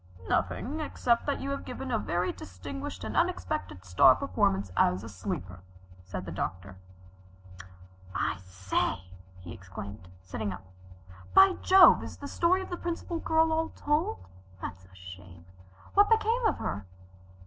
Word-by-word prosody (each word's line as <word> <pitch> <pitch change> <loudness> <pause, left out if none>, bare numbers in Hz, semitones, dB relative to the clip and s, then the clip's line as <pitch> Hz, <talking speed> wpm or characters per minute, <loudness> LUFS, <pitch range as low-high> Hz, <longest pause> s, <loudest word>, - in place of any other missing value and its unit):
"Nothing 295 +6 -1
except 245 -6 0
that 285 - -1
you 275 - -3
have 275 - -3
given 255 +1 -6
a 225 - +1
very 175 -1 -1
distinguished 90 0 -7
and - - -5
unexpected 90 +1 -1
star 90 -1 +6
performance 95 0 0
as 90 +3 +2
a 115 - -7
sleeper," 90 -1 -5 0.5
said 90 0 -6
the 85 - -6
Doctor. 90 +1 -5 1.4
"I - - 0
say!" 95 -1 -2 0.4
he 85 -1 -8
exclaimed, 95 +1 -9 0.2
sitting 100 +2 -4
up. 95 +1 -10 0.7
"By 385 0 +8
Jove, 380 0 +8
is - - -8
the 285 - -7
story 365 +5 +2
of - - -10
the 350 - -2
Principal 340 0 -4
Girl 320 0 +2
all 320 0 0
told? 290 - -1 0.3
That's 95 0 -7
a 95 +1 -20
shame. 90 -1 -12 0.5
What 405 +1 +5
became 450 +1 +3
of - - 0
her?" 95 0 -4
100 Hz, 150 wpm, -29 LUFS, -, 1.4 s, By